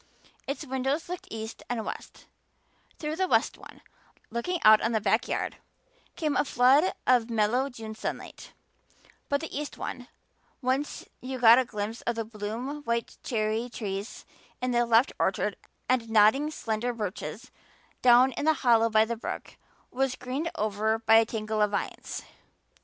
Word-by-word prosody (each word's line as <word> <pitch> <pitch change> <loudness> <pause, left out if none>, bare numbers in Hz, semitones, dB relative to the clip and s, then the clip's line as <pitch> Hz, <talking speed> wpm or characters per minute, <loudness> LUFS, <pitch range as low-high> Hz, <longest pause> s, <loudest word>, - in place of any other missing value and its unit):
Its 280 +3 -3
windows 265 +4 -1
looked 360 0 -6
east 220 0 -6
and 230 -3 -2
west; - - -8 0.7
through 305 0 -3
the 375 +2 0
west - - +2
one, - - -14 0.5
looking 335 +10 -2
out 215 0 +8
on 230 - 0
the 220 - +2
back 215 +3 +1
yard, - - -2 0.6
came 305 -3 -1
a - - +3
flood 275 +6 +4
of 245 -2 +3
mellow 230 +4 +1
June 225 -4 -8
sunlight; 215 - -6 0.8
but 285 0 +1
the 320 - -6
east 295 +1 -4
one, - - -6 0.5
whence 265 +2 -1 0.2
you 260 +1 -5
got 235 0 +8
a 260 - +1
glimpse 215 0 -4
of 235 - -2
the 225 -1 -3
bloom 225 +7 -5
white 235 -4 -2
cherry 220 +1 -1
trees 205 -2 -5 0.3
in 255 0 -1
the 240 0 +2
left 230 +3 +4
orchard - - 0 0.3
and 245 -3 +1
nodding, 225 +7 +5
slender 240 -4 -2
birches 210 -4 -5 0.5
down 250 +1 +6
in 285 - -4
the 315 - +5
hollow 230 -1 +5
by 220 0 +4
the 235 +1 -3
brook, 225 - -6 0.4
was 265 0 0
greened 270 +6 -3
over 215 0 0
by 225 0 +5
a 225 - +5
tangle 215 -1 -2
of 210 - +4
vines. 200 - -4
235 Hz, 160 wpm, -28 LUFS, 220-265 Hz, 0.8 s, out